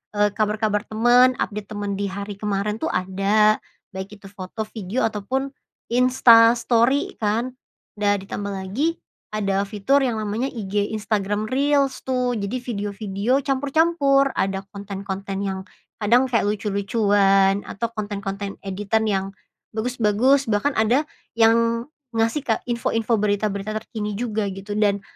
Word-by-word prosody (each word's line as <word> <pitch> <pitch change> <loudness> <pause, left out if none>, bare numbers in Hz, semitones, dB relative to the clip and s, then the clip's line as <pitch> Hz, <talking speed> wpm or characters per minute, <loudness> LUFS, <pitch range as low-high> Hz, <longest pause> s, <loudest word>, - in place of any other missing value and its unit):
eee, 205 0 +3
kabar-kabar 210 -1 0
temen, 245 +3 +4
update 205 -1 -3
temen 205 -1 -3
di 200 - -1
hari 200 +1 -5
kemarin 210 +1 -1
tuh - - 0
ada, 195 +4 +2 0.3
baik 190 +2 -6
itu 195 - -17
foto, 200 +2 -6
video, 215 +2 -2
ataupun 255 +6 -2 0.4
Insta 245 -2 +6
Story 235 +4 +2
kan, 230 +4 0 0.4
da 205 -1 +1
ditambah 200 +1 -5
lagi 200 - -2 0.3
ada 195 -2 0
fitur 260 +7 +2
yang 240 -4 0
namanya 215 +5 -2
IG 205 -3 -2
Instagram 205 0 -1
Reels 275 +1 +1
tuh. 250 -1 0
Jadi 210 +3 -2
video-video 205 0 -2
campur-campur, 275 0 +2
ada 195 0 -1
konten-konten 195 0 -5
yang 190 -1 -2 0.4
kadang 240 +5 +4
kayak 230 -5 +1
lucu-lucuan, 200 -1 +2
atau 220 +4 -3
konten-konten 200 -2 -4
editan 205 +3 0
yang 195 -2 0 0.5
bagus-bagus, 245 +3 +2
bahkan 225 +7 +1
ada 240 +7 +2 0.3
yang 230 +1 +3 0.3
ngasih 225 +6 +1
ke 225 - +2
info-info 235 -1 -1
berita-berita 210 0 -1
terkini 210 -2 -5
juga 220 -3 -1
gitu, 195 +2 -6
dan 200 -2 +2
215 Hz, 130 wpm, -23 LUFS, 200-240 Hz, 0.5 s, Insta